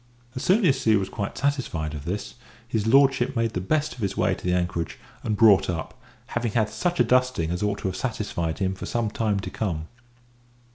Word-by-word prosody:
As 130 Hz, -, -3 dB
soon 195 Hz, +3 st, +3 dB
as 135 Hz, -5 st, +2 dB
he 110 Hz, -1 st, +5 dB
was 95 Hz, -2 st, 0 dB
quite 100 Hz, -2 st, -4 dB
satisfied 125 Hz, -, -1 dB
of 75 Hz, -1 st, -7 dB
this, 100 Hz, +4 st, -4 dB, 0.4 s
Lord 135 Hz, +6 st, +5 dB, 0.2 s
made 115 Hz, -2 st, 0 dB
the 90 Hz, -, -2 dB
best 150 Hz, +10 st, 0 dB
of -, -, -14 dB
his 100 Hz, -3 st, -2 dB
way -, -, +2 dB
to -, -, -8 dB
the 90 Hz, -, 0 dB
anchorage, 85 Hz, -2 st, -1 dB, 0.2 s
and 105 Hz, -2 st, -1 dB
brought 100 Hz, -4 st, +6 dB
up, 80 Hz, -3 st, -3 dB, 0.3 s
having 120 Hz, -2 st, -2 dB
had 110 Hz, -2 st, +2 dB
such 175 Hz, -1 st, -2 dB
a -, -, +7 dB
dusting 125 Hz, -10 st, +2 dB
as 90 Hz, -, -2 dB
ought 105 Hz, -1 st, 0 dB
to -, -, -1 dB
have 95 Hz, -, -3 dB
satisfied 95 Hz, -9 st, -2 dB
him 95 Hz, -1 st, 0 dB
for 95 Hz, -, -7 dB
some 115 Hz, -3 st, -1 dB
time 105 Hz, -3 st, 0 dB
to -, -, -6 dB
come. 85 Hz, -7 st, -3 dB
105 Hz, 210 wpm, -25 LUFS, 90-125 Hz, 0.4 s, a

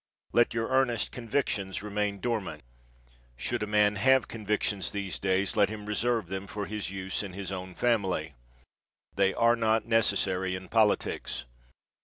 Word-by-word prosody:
Let 120 Hz, 0 st, +3 dB
your 115 Hz, 0 st, -1 dB
earnest 130 Hz, -4 st, +2 dB
convictions 105 Hz, -6 st, -2 dB
remain 105 Hz, -1 st, -1 dB
dormant. 100 Hz, -, -2 dB, 0.7 s
Should -, -, -2 dB
a 105 Hz, -, -1 dB
man 105 Hz, 0 st, +3 dB
have 130 Hz, +5 st, +4 dB
convictions 105 Hz, -2 st, -1 dB
these 100 Hz, -4 st, -4 dB
days, 95 Hz, 0 st, +1 dB
let 105 Hz, -2 st, +4 dB
him 105 Hz, -1 st, -7 dB
reserve 115 Hz, +1 st, 0 dB
them 95 Hz, +3 st, -5 dB
for 105 Hz, 0 st, -4 dB
use 95 Hz, -2 st, -3 dB
in 100 Hz, -3 st, -6 dB
his 100 Hz, 0 st, -5 dB
own 95 Hz, -1 st, -6 dB
family. 95 Hz, -10 st, 0 dB, 0.8 s
They 95 Hz, 0 st, +2 dB
are 115 Hz, 0 st, +4 dB
not 110 Hz, -1 st, +1 dB
necessary 95 Hz, -5 st, +1 dB
in 95 Hz, 0 st, -8 dB
politics. 105 Hz, -, +1 dB
105 Hz, 145 wpm, -29 LUFS, 95-115 Hz, 0.8 s, have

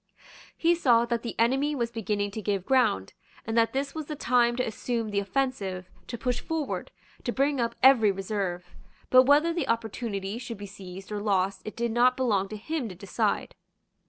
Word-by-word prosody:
He 340 Hz, +1 st, +4 dB
saw 240 Hz, -8 st, +4 dB
that 235 Hz, -1 st, -1 dB
the 235 Hz, -, -5 dB
enemy 270 Hz, +6 st, +2 dB
was 235 Hz, -3 st, -1 dB
beginning 205 Hz, -3 st, -2 dB
to 220 Hz, -, -5 dB
give 200 Hz, -2 st, -1 dB
ground, 240 Hz, -, +2 dB, 0.3 s
and 225 Hz, -, -3 dB
that 230 Hz, -1 st, +3 dB
this 275 Hz, +2 st, -2 dB
was 315 Hz, -2 st, -5 dB
the 300 Hz, -, -4 dB
time 240 Hz, -4 st, +2 dB
to 250 Hz, -, 0 dB
assume 225 Hz, 0 st, -3 dB
the 200 Hz, -, +1 dB
offensive, 195 Hz, -4 st, -2 dB, 0.2 s
to 235 Hz, -, -5 dB
push 250 Hz, +1 st, -1 dB
forward, 320 Hz, -3 st, -3 dB, 0.3 s
to 240 Hz, -, -1 dB
bring 275 Hz, +2 st, +1 dB
up 235 Hz, 0 st, -1 dB
every 245 Hz, -6 st, +7 dB
reserve. 190 Hz, -3 st, -4 dB, 0.4 s
But 255 Hz, 0 st, +8 dB
whether 300 Hz, +4 st, +5 dB
the 330 Hz, -6 st, -2 dB
opportunity 220 Hz, -2 st, -2 dB
should 235 Hz, -3 st, -6 dB
be 205 Hz, -, -7 dB
seized 190 Hz, 0 st, -10 dB
or 205 Hz, -1 st, -3 dB
lost 195 Hz, -2 st, 0 dB
it 215 Hz, -, -6 dB
did 235 Hz, 0 st, -1 dB
not 245 Hz, +2 st, +4 dB
belong 205 Hz, -7 st, +1 dB
to 215 Hz, -, -6 dB
him 275 Hz, +2 st, -3 dB
to 185 Hz, -, -9 dB
decide. 200 Hz, +2 st, -1 dB
230 Hz, 190 wpm, -27 LUFS, 200-255 Hz, 0.4 s, But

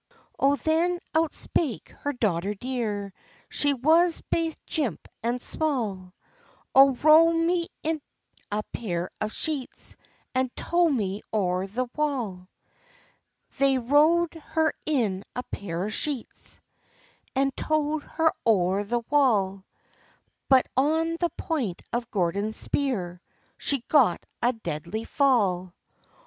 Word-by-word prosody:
Oh, 275 Hz, +1 st, +4 dB
then 330 Hz, +4 st, +1 dB, 0.2 s
out 320 Hz, -1 st, +2 dB
spake 285 Hz, -10 st, -1 dB
her 285 Hz, -, -1 dB
daughter 205 Hz, -6 st, -1 dB
dear, 210 Hz, -4 st, -3 dB, 0.4 s
She 285 Hz, -1 st, +2 dB
was 325 Hz, +6 st, +4 dB
baith 330 Hz, -1 st, 0 dB
jimp 265 Hz, -, -2 dB
and 240 Hz, +2 st, -1 dB
small: 215 Hz, -12 st, -2 dB, 0.6 s
"Oh, 270 Hz, 0 st, +7 dB
row 310 Hz, +5 st, +6 dB
me 335 Hz, +1 st, +1 dB, 0.2 s
in 315 Hz, -1 st, -1 dB, 0.5 s
a 210 Hz, +1 st, -1 dB
pair 180 Hz, -6 st, -3 dB
of 215 Hz, 0 st, -1 dB
sheets, 290 Hz, -3 st, -3 dB, 0.4 s
And 260 Hz, 0 st, +1 dB
tow 345 Hz, -1 st, +2 dB
me 205 Hz, -7 st, -1 dB
o'er 185 Hz, -3 st, 0 dB
the 250 Hz, +6 st, -2 dB
wall." 235 Hz, -12 st, -2 dB, 1.1 s
They 275 Hz, -1 st, +4 dB
row'd 305 Hz, +7 st, +3 dB
her 320 Hz, 0 st, 0 dB
in 220 Hz, -11 st, +1 dB
a 250 Hz, -, -2 dB
pair 180 Hz, -5 st, -4 dB
of 215 Hz, -, -4 dB
sheets, 280 Hz, -3 st, -3 dB, 0.8 s
And 270 Hz, 0 st, +1 dB
tow'd 310 Hz, 0 st, 0 dB
her 320 Hz, +2 st, +1 dB
o'er 195 Hz, -2 st, +3 dB
the 235 Hz, +3 st, -1 dB
wall; 200 Hz, -9 st, +2 dB, 0.8 s
But 265 Hz, -2 st, +6 dB
on 320 Hz, +5 st, +2 dB
the 345 Hz, -, +1 dB
point 250 Hz, -, -2 dB
of 240 Hz, 0 st, -2 dB
Gordon's 200 Hz, +2 st, 0 dB
spear 185 Hz, -11 st, -2 dB, 0.3 s
She 275 Hz, -4 st, -1 dB
got 250 Hz, -, +4 dB, 0.2 s
a 240 Hz, -, +3 dB
deadly 215 Hz, -2 st, -5 dB
fall. 200 Hz, -11 st, +1 dB
255 Hz, 120 wpm, -26 LUFS, 200-305 Hz, 1.1 s, Oh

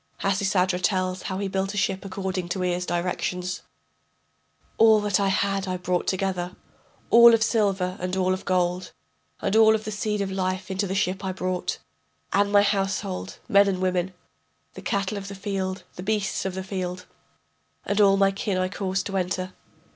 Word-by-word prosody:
[Hasisadra 190 Hz, -2 st, +1 dB
tells 185 Hz, -1 st, 0 dB
how 190 Hz, -, -4 dB
he 200 Hz, 0 st, -2 dB
built 190 Hz, 0 st, -1 dB
the -, -, -5 dB
ship 190 Hz, -1 st, 0 dB
according 190 Hz, -2 st, -4 dB
to 185 Hz, 0 st, -2 dB
Ea's 180 Hz, 0 st, -1 dB
directions.] 180 Hz, +1 st, -2 dB, 1.2 s
All 220 Hz, -1 st, +7 dB
that 205 Hz, -2 st, +1 dB
I 200 Hz, -, +2 dB
had 195 Hz, 0 st, 0 dB
I 185 Hz, 0 st, -1 dB
brought 180 Hz, 0 st, -1 dB
together, 185 Hz, -2 st, -1 dB, 0.6 s
All 235 Hz, 0 st, +9 dB
of 225 Hz, -, +1 dB
silver 195 Hz, -5 st, +1 dB
and 185 Hz, +1 st, -2 dB
all 185 Hz, 0 st, +2 dB
of 185 Hz, -, -4 dB
gold, 180 Hz, 0 st, 0 dB, 0.5 s
And 200 Hz, -, +1 dB
all 220 Hz, 0 st, +7 dB
of 215 Hz, -, -3 dB
the 215 Hz, -, -4 dB
seed 210 Hz, 0 st, -2 dB
of 195 Hz, -1 st, -2 dB
life 185 Hz, 0 st, -2 dB
into 195 Hz, +1 st, -1 dB
the 190 Hz, -, -2 dB
ship 190 Hz, -1 st, 0 dB
I 190 Hz, -, -1 dB
brought. 185 Hz, -1 st, -2 dB, 0.6 s
And 200 Hz, +1 st, +3 dB
my 205 Hz, 0 st, +6 dB
household, 195 Hz, -, -1 dB
men 200 Hz, 0 st, +5 dB
and 190 Hz, -2 st, 0 dB
women, 185 Hz, 0 st, -1 dB, 0.6 s
The -, -, -9 dB
cattle 200 Hz, +1 st, -1 dB
of 195 Hz, -, -8 dB
the 200 Hz, -, -7 dB
field, 190 Hz, -1 st, -3 dB
the -, -, -5 dB
beasts 200 Hz, 0 st, -1 dB
of 190 Hz, -1 st, -3 dB
the 190 Hz, -, -4 dB
field, 185 Hz, -1 st, -4 dB, 0.8 s
And 205 Hz, +1 st, +1 dB
all 195 Hz, -1 st, +5 dB
my 195 Hz, 0 st, +4 dB
kin 195 Hz, 0 st, -2 dB
I 185 Hz, 0 st, 0 dB
caused 190 Hz, -1 st, -2 dB
to 195 Hz, -1 st, -2 dB
enter. 185 Hz, 0 st, -2 dB
190 Hz, 185 wpm, -25 LUFS, 185-200 Hz, 1.2 s, All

